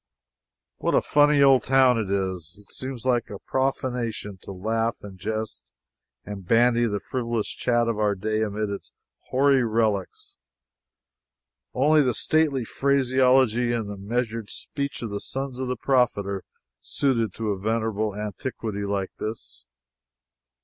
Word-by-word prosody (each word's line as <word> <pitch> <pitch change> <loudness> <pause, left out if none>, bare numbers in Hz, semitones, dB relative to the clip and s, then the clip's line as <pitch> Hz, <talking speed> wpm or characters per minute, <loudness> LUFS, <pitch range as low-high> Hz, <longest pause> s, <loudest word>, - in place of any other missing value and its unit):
What - - 0
a - - +5
funny 145 -1 +4
old 135 -2 +6
town 130 -2 +4
it 105 -4 -2
is! 95 -2 -2
It 105 - -17
seems 130 -2 -6
like 120 -3 +1 0.2
profanation 125 -6 -2
to - - -9
laugh 115 +4 -1
and 95 -2 -10
jest 110 +2 -4 0.5
and 100 -2 -7
bandy 120 +4 +3
the 105 -2 -1
frivolous 115 -1 -2
chat 120 -1 +1
of 115 -2 -1
our 105 -1 +2
day 110 +3 -1
amid 105 -1 -1
its 100 - -7 0.4
hoary 135 0 +4
relics. 110 -4 -1 1.4
Only 150 +4 +5
the 125 -4 +1
stately 150 -6 +1
phraseology 130 -3 +3
and 115 -3 -2
the 105 - -5
measured 115 +1 -3
speech 140 -3 -4
of 110 - -4
the 100 - -3
sons 135 -1 -4
of 130 - -2
the 125 0 -2
Prophet 125 -5 +2
are 100 -1 -4 0.4
suited 115 -7 0
to 110 -2 -2
a 100 - -3
venerable 110 -1 -1
antiquity 105 0 -4
like 100 -1 -2
this. 110 - -6
115 Hz, 140 wpm, -25 LUFS, 105-130 Hz, 1.4 s, old